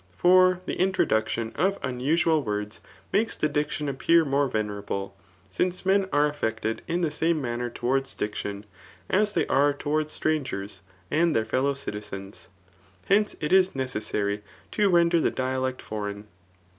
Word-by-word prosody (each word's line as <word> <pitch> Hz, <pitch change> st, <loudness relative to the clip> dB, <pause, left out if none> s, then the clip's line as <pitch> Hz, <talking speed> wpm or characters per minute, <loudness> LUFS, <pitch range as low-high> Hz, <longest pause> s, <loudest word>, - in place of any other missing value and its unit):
For 185 Hz, -, +5 dB
the -, -, -4 dB
introduction 115 Hz, -11 st, +1 dB
of 195 Hz, +1 st, +1 dB
unusual 150 Hz, +5 st, +1 dB
words, 105 Hz, -3 st, -4 dB, 0.3 s
makes 220 Hz, +2 st, +1 dB
the 155 Hz, -, +1 dB
diction 150 Hz, 0 st, -2 dB
appear 160 Hz, +4 st, +3 dB
more 140 Hz, 0 st, +2 dB
venerable; 100 Hz, -3 st, -3 dB, 0.4 s
since 180 Hz, -, -1 dB
men 195 Hz, 0 st, +3 dB
are 145 Hz, +1 st, +3 dB
aflPected 110 Hz, -5 st, -2 dB
in 170 Hz, +2 st, -1 dB
the 165 Hz, -3 st, 0 dB
same 165 Hz, +1 st, +1 dB
manner 120 Hz, -2 st, -3 dB
towards 135 Hz, +3 st, -1 dB
diction, 105 Hz, -1 st, -4 dB, 0.5 s
as 210 Hz, +2 st, +2 dB
they -, -, +1 dB
are 145 Hz, +2 st, +3 dB
towards 150 Hz, +2 st, -1 dB
strangers, 105 Hz, -13 st, -2 dB, 0.3 s
and 165 Hz, +1 st, +2 dB
their 110 Hz, -, +2 dB
fellow 140 Hz, +4 st, 0 dB
citizens. 105 Hz, -6 st, -7 dB, 0.6 s
Hence 210 Hz, +1 st, +2 dB
it 150 Hz, +3 st, 0 dB
is 190 Hz, -3 st, +4 dB
necessary 105 Hz, -5 st, -2 dB, 0.3 s
to 205 Hz, -2 st, +2 dB
ren 170 Hz, -2 st, +4 dB
der 170 Hz, 0 st, +3 dB
the -, -, +2 dB
dialect 130 Hz, 0 st, -2 dB
foreign. 105 Hz, -1 st, -5 dB
140 Hz, 145 wpm, -26 LUFS, 110-170 Hz, 0.6 s, For